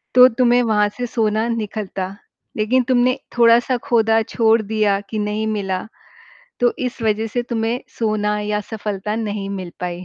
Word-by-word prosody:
तो 250 0 +10
तुम्हें 245 +1 +3
वहाँ 210 -2 +2
से 245 - -2
सोना 220 -1 0
निकलता, 205 -4 -4 0.4
लेकिन 235 +4 +2
तुमने 255 0 +2 0.2
थोड़ा-सा 235 +2 +4
खोदा 225 -1 +3
छोड़ 225 0 +2
दिया 210 -2 +1
कि 220 - -3
नहीं 210 +1 -1
मिला, 195 -4 -2 0.8
तो 245 -1 +3
इस 250 -1 -4
वज़ह 220 0 +1
से 240 +3 -2
तुम्हे 235 0 -2 0.2
सोना 210 -2 0
या 210 0 -1
सफलता 210 -1 -3
नहीं 205 -3 -3
मिल 185 -3 -6
पाई। 180 0 -4
220 Hz, 155 wpm, -20 LUFS, 210-235 Hz, 0.8 s, तो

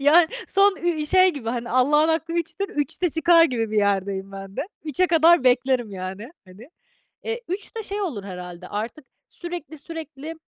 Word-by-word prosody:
ya, 315 +5 +6 0.2
son, 395 0 +4
iii, 315 -3 0
şey 370 +3 +5
gibi, 235 -5 -6
hani, 235 0 -3
"Allah'ın 295 +5 +3
hakkı 325 +1 0
üçtür, 340 +4 -2
üçte 300 +3 -1
çıkar." 330 +1 +5
gibi 230 -7 -1
bir 215 - -2
yerdeyim 195 -1 0
ben 195 0 -9
de. - - -1 0.2
3'e 320 +5 +1
kadar 330 -3 +5
beklerim, 250 -2 +2
yani, 190 +6 -6 0.2
hani. 200 +8 -14 0.6
Eee, 460 +1 -3
3 390 +6 -5
de 450 - -3
şey 410 0 -4
olur 255 - -3
herhâlde, 180 -1 -8
artık 225 +8 -5 0.2
sürekli 345 -3 -7
sürekli, 315 -1 -8
295 Hz, 170 wpm, -23 LUFS, 215-340 Hz, 0.6 s, ya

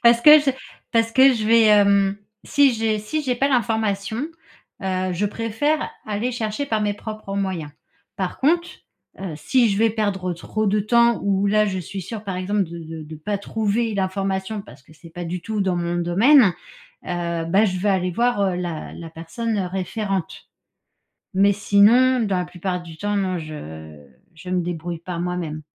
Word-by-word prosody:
Parce 235 0 +6
que 300 +4 +9
je 290 -2 +1 0.4
parce 230 0 +2
que 265 +1 +6
je 220 -2 -2
vais, 230 0 +5
hem, 200 -2 +4 0.3
si 280 -3 +4
j'ai 220 -1 0
si 300 +9 -3
j'ai 255 -3 0
pas 275 +3 +1
l'information, 220 -4 0 0.7
heu, 185 -1 -1
je 195 +4 0
préfère 230 +9 -1 0.2
aller 215 +4 -2
chercher 225 +2 -2
par 220 -3 0
mes 205 -1 0
propres 215 -2 -7
moyens. 190 -6 -2 0.5
Par 185 -2 -3
contre, 340 +6 0 0.4
heu, 190 -5 -5
si 240 - +2
je 195 - 0
vais 225 0 +4
perdre 200 -4 -1
trop 215 +5 -3
de 205 +1 +2
temps 235 +2 +3
ou 200 0 +1
là 215 +1 +3
je 190 -2 -2
suis 195 +2 -6
sûre, 215 +4 -7
par 190 -2 -4
exemple, 200 +2 0
de 170 0 -9
de 160 -1 -8
de 155 +1 -9
pas 200 +7 -3
trouver 220 +2 -1
l'information, 195 +1 -2
parce 130 -3 -15
que 155 - -20
c'est 165 +2 -15
pas 175 +1 -6
du 175 +1 -4
tout 220 -2 -3
dans 190 -2 +1
mon 175 0 -1
domaine, 195 - +5 0.6
heu, 170 -2 -2
bah, 195 +6 +3
je 185 -3 -1
vais 200 +3 0
aller 185 -2 +1
voir, 240 +1 +1
heu, 190 -2 +1
la 175 -3 -5
la 165 -1 -9
personne 170 +8 -4
référente. 190 0 -3 0.9
Mais 200 +2 +4
sinon, 225 +6 +4
dans 200 -5 0
la 180 - -1
plupart 180 0 -4
du 165 -2 -11
temps, 205 0 -2
non, 185 -2 -1
je 80 - -9 0.3
je 165 +3 -9
me 185 -1 +1
débrouille 170 -1 -4
par 170 0 -6
moi-même. 170 -3 -3
200 Hz, 185 wpm, -22 LUFS, 175-220 Hz, 0.9 s, que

